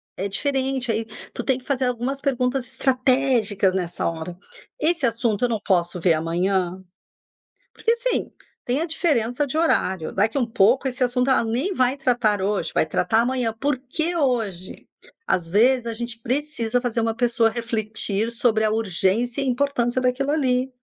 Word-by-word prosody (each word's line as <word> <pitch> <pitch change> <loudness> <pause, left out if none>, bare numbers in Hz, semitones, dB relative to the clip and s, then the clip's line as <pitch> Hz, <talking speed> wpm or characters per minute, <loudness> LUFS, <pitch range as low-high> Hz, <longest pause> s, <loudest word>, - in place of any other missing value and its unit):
é 195 - -3
diferente. 265 +1 0
Aí, 225 0 -1 0.3
tu 240 - -4
tem 265 -2 +1
que 255 - -14
fazer 265 -2 0
algumas 250 +3 -2
perguntas 255 -1 0
estratégicas 255 -7 +1
nessa 180 -2 -2
hora: 165 +1 -5 0.4
"Esse 320 -4 +2
assunto, 230 -1 0
eu 245 - -1
não 220 -2 -1
posso 180 -3 0
ver 170 0 +3
amanhã?". 180 +3 -1 0.9
Porque, 460 - +1
assim, - - -1 0.4
tem 255 +5 0
a - - 0
diferença 285 -5 0
de 285 - -3
horário. 190 - +1
Daqui 215 +7 0
um 250 - +2
pouco, 235 +4 +3
esse 255 +1 -8
assunto 250 +1 +1
ela 260 - +3
nem 255 - -1
vai 255 -3 +2
tratar 240 -7 +1
hoje. 200 -3 -1
Vai - - +2
tratar 220 +8 +1
amanhã. 245 -2 0
Por 275 +4 -1
que 315 +6 -1
hoje? 225 - -2 0.4
Às 170 -2 0
vezes, 235 +6 +3
a 230 - -2
gente 235 0 -5
precisa 250 -2 -1
fazer 240 -2 -1
uma 225 0 -1
pessoa 235 -1 +2
refletir 220 -2 -1
sobre 230 -2 +1
a 215 - +1
urgência 220 +4 0
e - - -1
importância 255 -1 0
daquilo 255 +3 0
ali, 260 -4 +1
240 Hz, 165 wpm, -23 LUFS, 215-265 Hz, 0.9 s, ver